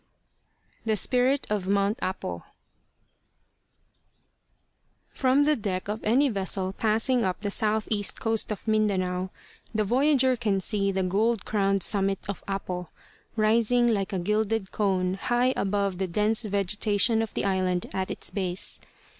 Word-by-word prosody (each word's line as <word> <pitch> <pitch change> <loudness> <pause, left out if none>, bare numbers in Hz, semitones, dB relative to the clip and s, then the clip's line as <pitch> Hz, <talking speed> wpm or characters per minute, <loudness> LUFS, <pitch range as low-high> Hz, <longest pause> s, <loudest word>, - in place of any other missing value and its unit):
THE 220 -1 +1
SPIRIT 255 +6 +2
OF 200 -3 -1
MT. 200 +3 +1
APO 185 - -4 2.7
From 265 +2 +2
the 300 +1 +3
deck 195 -5 -3
of 215 +1 -4
any 255 +7 +3
vessel 190 -4 -2
passing 225 +4 +1
up 185 -1 -2
the 205 -1 -2
southeast 215 -1 0
coast 225 -1 -1
of 210 - -6
Mindanao, 190 -4 0 0.5
the 215 - +2
voyager 260 +3 +3
can 215 -5 0
see 200 0 +1
the 190 0 -1
gold 210 +4 +1
crowned 195 -2 +1
summit 195 -1 +1
of 200 - -5
Apo, 185 -3 -4 0.5
rising 230 +2 +3
like 200 -4 0
a 195 - -1
gilded 210 +2 -1
cone 190 -2 0
high 245 +1 +2
above 200 -2 -1
the 190 - -1
dense 210 +5 +1
vegetation 205 +2 +2
of 225 - -4
the - - -1
island 185 -2 0
at 190 0 -2
its - - -1
base. 185 -2 -3
205 Hz, 140 wpm, -26 LUFS, 190-225 Hz, 2.7 s, the